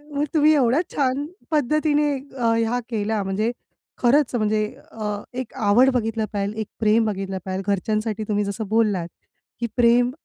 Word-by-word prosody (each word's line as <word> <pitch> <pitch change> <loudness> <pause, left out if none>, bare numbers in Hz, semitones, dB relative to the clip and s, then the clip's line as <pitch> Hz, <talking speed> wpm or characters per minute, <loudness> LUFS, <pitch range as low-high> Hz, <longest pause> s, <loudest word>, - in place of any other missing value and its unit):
मग 290 +1 +1
तुम्ही 310 -1 +5
एवढ्या 265 +2 +3
छान 275 0 0 0.3
पद्धतीने 300 +1 +2 0.3
अ, 230 -2 +2 0.2
हा 245 +1 0
केला, 215 -2 -1
म्हणजे 200 +4 -1 0.5
खरंच 260 +2 +3
म्हणजे 215 -1 +1 0.3
अ, 220 -1 -6 0.3
एक 255 -1 -5
आवड 240 +2 +4
बघितलं 225 -2 0
पाहिजे, 200 0 -1
एक 220 -2 -3
प्रेम 220 0 +3 0.4
पाहिजे, 190 0 -3
घरच्यांसाठी 215 +2 -1
तुम्ही 205 0 +1
जसं 200 +2 -4
बोललात, 210 -6 +1 0.5
की 235 - -1
प्रेम 240 +1 +4
225 Hz, 145 wpm, -23 LUFS, 210-255 Hz, 0.5 s, तुम्ही